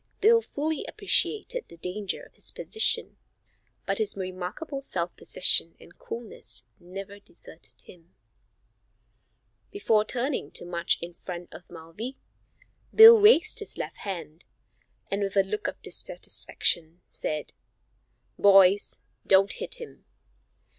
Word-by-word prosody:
Bill 460 Hz, +3 st, +5 dB
fully 310 Hz, -4 st, -3 dB
appreciated 440 Hz, +3 st, 0 dB
the 170 Hz, -, -14 dB
danger 185 Hz, +4 st, -4 dB
of -, -, -17 dB
his -, -, -5 dB
position, 440 Hz, -, -1 dB, 0.7 s
but -, -, -1 dB
his 435 Hz, -, -2 dB
remarkable 185 Hz, -, -5 dB
self 175 Hz, -9 st, -3 dB
possession 170 Hz, -2 st, +3 dB
and 170 Hz, -, -18 dB
coolness 165 Hz, -, -8 dB, 0.2 s
never 195 Hz, +3 st, -9 dB
deserted 170 Hz, -4 st, -11 dB
him. 170 Hz, 0 st, -18 dB, 1.5 s
Before 225 Hz, -, +2 dB
turning 250 Hz, -, -2 dB
to -, -, -5 dB
march 170 Hz, -1 st, 0 dB
in 175 Hz, 0 st, -7 dB
front 175 Hz, 0 st, -8 dB
of 165 Hz, +2 st, -13 dB
Mulvey, 175 Hz, +10 st, -8 dB, 0.7 s
Bill 445 Hz, 0 st, +10 dB
raised 420 Hz, -2 st, +5 dB
his 420 Hz, -, -5 dB
left -, -, -5 dB
hand, 175 Hz, -4 st, -7 dB, 0.7 s
and 200 Hz, +1 st, -1 dB
with 200 Hz, 0 st, -2 dB
a 195 Hz, -, +6 dB
look 210 Hz, +2 st, -3 dB
of -, -, -5 dB
dissatisfaction, 170 Hz, -, -1 dB
said: 150 Hz, -1 st, -4 dB, 0.9 s
"Boys, 195 Hz, 0 st, +5 dB, 0.3 s
don't 195 Hz, +1 st, +5 dB
hit -, -, -2 dB
him." 475 Hz, -, -11 dB
195 Hz, 120 wpm, -27 LUFS, 175-290 Hz, 1.5 s, Bill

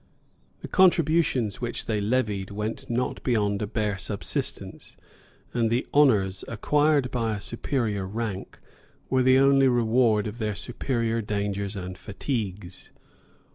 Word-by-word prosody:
The -, -, -6 dB
contributions 160 Hz, -, +3 dB
which 120 Hz, -1 st, -3 dB
they 110 Hz, -2 st, -1 dB
levied 105 Hz, -3 st, 0 dB
went 105 Hz, +2 st, -5 dB
not 125 Hz, +2 st, -1 dB
beyond 105 Hz, -5 st, 0 dB
a 105 Hz, -, -1 dB
bare 105 Hz, -2 st, -2 dB
subsistence; 100 Hz, +1 st, -5 dB, 0.6 s
and 115 Hz, -2 st, +1 dB
the 120 Hz, +2 st, 0 dB
honors, 105 Hz, -10 st, +3 dB
acquired 145 Hz, +3 st, +2 dB
by 115 Hz, -3 st, -1 dB
a -, -, -5 dB
superior 110 Hz, -2 st, -2 dB
rank, 105 Hz, -2 st, -5 dB, 0.5 s
were 130 Hz, 0 st, +3 dB
the 130 Hz, +1 st, +5 dB
only 135 Hz, 0 st, +5 dB
reward 115 Hz, -3 st, +3 dB
of 110 Hz, +2 st, -6 dB
their 105 Hz, -2 st, -1 dB
superior 115 Hz, -1 st, -2 dB
dangers 100 Hz, -1 st, -2 dB
and 95 Hz, -1 st, -6 dB
fatigues. 100 Hz, -3 st, -5 dB
110 Hz, 130 wpm, -26 LUFS, 100-125 Hz, 0.6 s, the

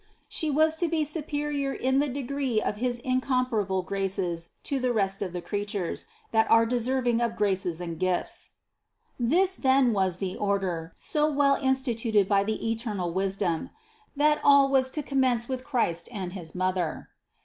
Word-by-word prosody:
She 315 Hz, -, -1 dB
was 315 Hz, +2 st, +3 dB
to 345 Hz, -, +1 dB
be 320 Hz, -1 st, 0 dB
superior 295 Hz, -2 st, -2 dB
in 265 Hz, +1 st, +1 dB
the 290 Hz, -, +2 dB
degree 270 Hz, -2 st, -1 dB
of 210 Hz, -, -2 dB
his 245 Hz, +1 st, -1 dB
incomparable 255 Hz, -7 st, 0 dB
graces 185 Hz, -2 st, -2 dB
to 280 Hz, -, -1 dB
all -, -, -3 dB
the 250 Hz, -1 st, +1 dB
rest 195 Hz, -3 st, 0 dB
of 190 Hz, -3 st, -2 dB
the 180 Hz, 0 st, -5 dB
creatures, 205 Hz, -3 st, -3 dB, 0.2 s
that 220 Hz, 0 st, +3 dB
are 230 Hz, 0 st, +6 dB
deserving 245 Hz, 0 st, 0 dB
of 235 Hz, -1 st, 0 dB
graces 190 Hz, -5 st, 0 dB
and 170 Hz, -2 st, -5 dB
gifts. 185 Hz, -1 st, -1 dB, 0.7 s
This 360 Hz, +11 st, +2 dB
then 260 Hz, -4 st, +3 dB
was 190 Hz, -3 st, +1 dB
the 185 Hz, -1 st, -3 dB
order, 190 Hz, -5 st, -1 dB
so 300 Hz, 0 st, 0 dB
well 280 Hz, -1 st, +3 dB
instituted 240 Hz, -7 st, +1 dB
by 200 Hz, -1 st, +3 dB
the 220 Hz, +2 st, -2 dB
eternal 210 Hz, -7 st, -3 dB
wisdom: 190 Hz, -3 st, -1 dB, 0.5 s
that 300 Hz, +1 st, +3 dB
all 280 Hz, -1 st, +6 dB
was 265 Hz, -1 st, +3 dB
to 300 Hz, +3 st, -3 dB
commence 255 Hz, -4 st, +1 dB
with 255 Hz, -1 st, -4 dB
Christ 175 Hz, -, -1 dB
and 190 Hz, -6 st, -5 dB
his 175 Hz, -4 st, -7 dB
Mother. 185 Hz, -3 st, -1 dB
230 Hz, 165 wpm, -27 LUFS, 190-270 Hz, 0.7 s, are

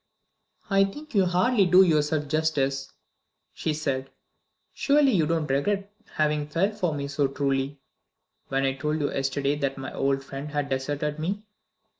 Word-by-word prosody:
"I 195 Hz, -1 st, +4 dB
think 295 Hz, +10 st, -9 dB
you 195 Hz, -3 st, +4 dB
hardly 195 Hz, +3 st, +3 dB
do 180 Hz, +2 st, +7 dB
yourself 150 Hz, -3 st, +1 dB
justice," 140 Hz, -3 st, 0 dB, 0.6 s
she 160 Hz, -, -2 dB
said. 135 Hz, -3 st, -2 dB, 0.6 s
"Surely 285 Hz, -1 st, +3 dB
you 165 Hz, -8 st, +2 dB
don't 165 Hz, -2 st, 0 dB
regret 195 Hz, +9 st, -1 dB, 0.2 s
having 150 Hz, -1 st, +1 dB
felt 185 Hz, +7 st, 0 dB
for 175 Hz, -6 st, -1 dB
me 140 Hz, -1 st, -3 dB
so 140 Hz, 0 st, +1 dB
truly, 135 Hz, 0 st, -1 dB, 0.7 s
when 135 Hz, 0 st, 0 dB
I 135 Hz, -, +1 dB
told 150 Hz, +3 st, -2 dB
you 145 Hz, -, 0 dB
yesterday 140 Hz, +1 st, 0 dB
that 140 Hz, -1 st, -2 dB
my 135 Hz, -, -6 dB
old 135 Hz, 0 st, 0 dB
friend 135 Hz, +2 st, -7 dB
had 145 Hz, -1 st, -2 dB
deserted 145 Hz, +3 st, -2 dB
me?" 195 Hz, +6 st, -2 dB
150 Hz, 155 wpm, -26 LUFS, 140-180 Hz, 0.7 s, do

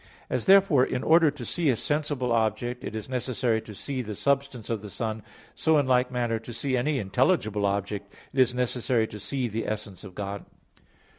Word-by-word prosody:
As -, -, 0 dB
therefore 190 Hz, -9 st, +6 dB
in 130 Hz, -1 st, -1 dB
order 165 Hz, 0 st, +6 dB
to 140 Hz, -4 st, -7 dB
see 170 Hz, +2 st, 0 dB
a 130 Hz, -, +3 dB
sensible 145 Hz, -2 st, -1 dB
object, 120 Hz, +2 st, 0 dB
it -, -, -5 dB
is 110 Hz, -, -5 dB
not 130 Hz, -, -8 dB
necessary 120 Hz, -2 st, 0 dB
to 105 Hz, -, -11 dB
see 135 Hz, +4 st, -3 dB
the 105 Hz, -3 st, -5 dB
substance 135 Hz, -3 st, -1 dB
of 110 Hz, -3 st, -1 dB
the 105 Hz, -, -8 dB
sun, 110 Hz, +1 st, -3 dB, 0.3 s
so 160 Hz, -1 st, +3 dB
in 145 Hz, -, +3 dB
like 125 Hz, -1 st, +3 dB
manner 120 Hz, -2 st, -1 dB
to 115 Hz, +2 st, -9 dB
see 130 Hz, +3 st, -1 dB
any 140 Hz, +4 st, +1 dB
intelligible 110 Hz, -, +1 dB
object, 100 Hz, 0 st, -3 dB, 0.2 s
it 135 Hz, -, -2 dB
is 130 Hz, -2 st, +5 dB
not 125 Hz, 0 st, -1 dB
necessary 125 Hz, -1 st, +1 dB
to 105 Hz, -1 st, -9 dB
see 130 Hz, +4 st, -2 dB
the 115 Hz, +1 st, -3 dB
essence 105 Hz, -3 st, -5 dB
of 95 Hz, -3 st, -11 dB
God. 100 Hz, 0 st, -4 dB
120 Hz, 210 wpm, -27 LUFS, 110-135 Hz, 0.3 s, therefore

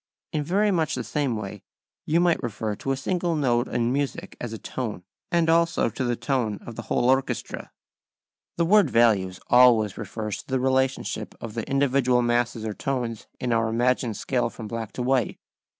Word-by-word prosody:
In 150 Hz, -, 0 dB
very 200 Hz, +7 st, +2 dB
much 165 Hz, -4 st, +1 dB
the -, -, -3 dB
same 140 Hz, -5 st, -1 dB
way 105 Hz, -2 st, -6 dB, 0.5 s
you 165 Hz, +2 st, +3 dB
might 175 Hz, -1 st, +3 dB
refer 110 Hz, -2 st, -3 dB
to 135 Hz, -, -3 dB
a 135 Hz, -, 0 dB
single 175 Hz, +3 st, -1 dB
note 120 Hz, -5 st, +1 dB
in 120 Hz, +1 st, 0 dB
music 140 Hz, 0 st, -3 dB
as 120 Hz, -, -4 dB
a 110 Hz, -, -5 dB
tone, 110 Hz, -5 st, -5 dB, 0.3 s
and 170 Hz, -2 st, +3 dB
also 165 Hz, -5 st, +3 dB
to 130 Hz, -, -3 dB
the 120 Hz, -1 st, 0 dB
tone 120 Hz, -3 st, -1 dB
of 120 Hz, -, -7 dB
the -, -, -5 dB
whole 120 Hz, -, 0 dB
orchestra. 130 Hz, +1 st, 0 dB, 0.9 s
The 170 Hz, -, +2 dB
word 200 Hz, -2 st, +5 dB
values 105 Hz, -7 st, +3 dB
always 115 Hz, -5 st, +5 dB
refers 110 Hz, -1 st, -4 dB
to -, -, -30 dB
the 130 Hz, -1 st, 0 dB
relationship 130 Hz, +1 st, 0 dB
of 115 Hz, -2 st, -7 dB
the 115 Hz, +2 st, -4 dB
individual 135 Hz, -3 st, +2 dB
masses 120 Hz, -1 st, 0 dB
or 110 Hz, -, -2 dB
tones 120 Hz, -3 st, -3 dB
in 125 Hz, -2 st, 0 dB
our 115 Hz, -1 st, +2 dB
imagined 120 Hz, -1 st, +1 dB
scale 125 Hz, -2 st, 0 dB
from 110 Hz, -, -8 dB
black 115 Hz, 0 st, -5 dB
to 125 Hz, -, -3 dB
white. 130 Hz, -2 st, +1 dB
125 Hz, 185 wpm, -25 LUFS, 115-140 Hz, 0.9 s, word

